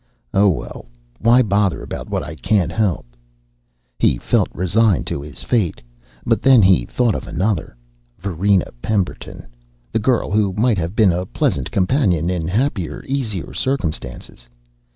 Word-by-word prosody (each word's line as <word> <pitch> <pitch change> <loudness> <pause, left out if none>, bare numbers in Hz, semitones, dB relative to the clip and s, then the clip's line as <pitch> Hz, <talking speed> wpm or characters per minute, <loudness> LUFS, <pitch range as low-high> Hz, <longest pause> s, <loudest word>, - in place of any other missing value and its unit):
Oh, 100 +1 +5
well, 90 - -5 0.3
why 120 +3 +5
bother 100 -3 +1
about - - -7
what - - -2
I 75 - -7
can't 95 +1 0
help?" 95 - 0 0.9
He - - +3
felt - - +1
resigned 100 +2 +1
to - - -3
his 75 -1 -9
fate. 105 -9 0 0.5
But - - +1
then 130 -5 +6
he 95 -10 +4
thought 120 -3 +1
of - - -5
another 95 - -2 0.4
Varina 95 +1 0
Pemberton, 100 0 -3 0.5
the - - 0
girl 120 0 +1
who 100 -2 +1
might 110 0 +1
have 85 +4 -3
been 105 -5 +5
a 90 +2 -2
pleasant 65 -3 -1
companion 90 - +1
in 85 -3 -2
happier, 105 - -1
easier 115 -10 -3
circumstances. 75 - -4
100 Hz, 145 wpm, -19 LUFS, 85-110 Hz, 0.9 s, then